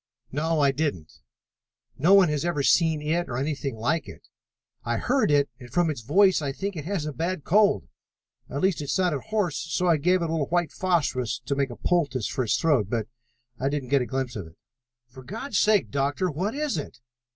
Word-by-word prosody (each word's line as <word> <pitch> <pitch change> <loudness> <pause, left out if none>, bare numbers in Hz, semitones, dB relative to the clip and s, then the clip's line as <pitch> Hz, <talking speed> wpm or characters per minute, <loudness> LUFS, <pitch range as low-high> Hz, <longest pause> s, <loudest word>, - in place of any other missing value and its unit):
"No, 155 +2 0
I 140 -1 +4
didn't. 140 - -3 0.8
No 170 +10 +5
one 195 -3 +6
has 150 -1 -1
ever 170 -5 -1
seen 160 0 +3
it 170 +3 -1
or 120 - -3
anything 140 -2 -2
like 140 +9 -1
it. - - -13 0.5
I 120 -1 -1
heard 260 - +1
it 145 -1 +3
and, 125 -2 -11
from 165 +5 +1
its 135 - -6
voice, 185 - +4
I 140 -2 -2
think 195 +7 -4
it 150 -3 -6
has 185 -4 -2
a 150 - -4
bad 165 +3 -3
cold. 200 - +3 0.6
At 140 - -3
least, 190 -4 +1
it 145 - -6
sounded 180 -7 +1
hoarse, 205 -8 0
so 175 +2 -2
I 170 -3 +4
gave 180 +4 +2
it - - 0
a - - -4
little 155 -4 0
white 175 -3 0
phosphorus 145 -11 0
to 140 - -1
make 140 -1 0
a 120 - -7
poultice 140 - 0
for 130 - -2
its 110 - +2
throat, 140 - +2
but 110 -1 -2 0.5
I 135 - 0
didn't 140 -3 -3
get 140 -1 +3
a 125 - -2
glimpse 130 +1 -3
of 100 -6 -6
it." 80 - -17 0.5
"For 130 +2 -13
God's 215 - -3
sake, 210 -2 +3
Doctor, 145 +6 0
what 185 - -2
is 295 - -1
it?" 145 - -8
150 Hz, 215 wpm, -26 LUFS, 135-180 Hz, 0.8 s, one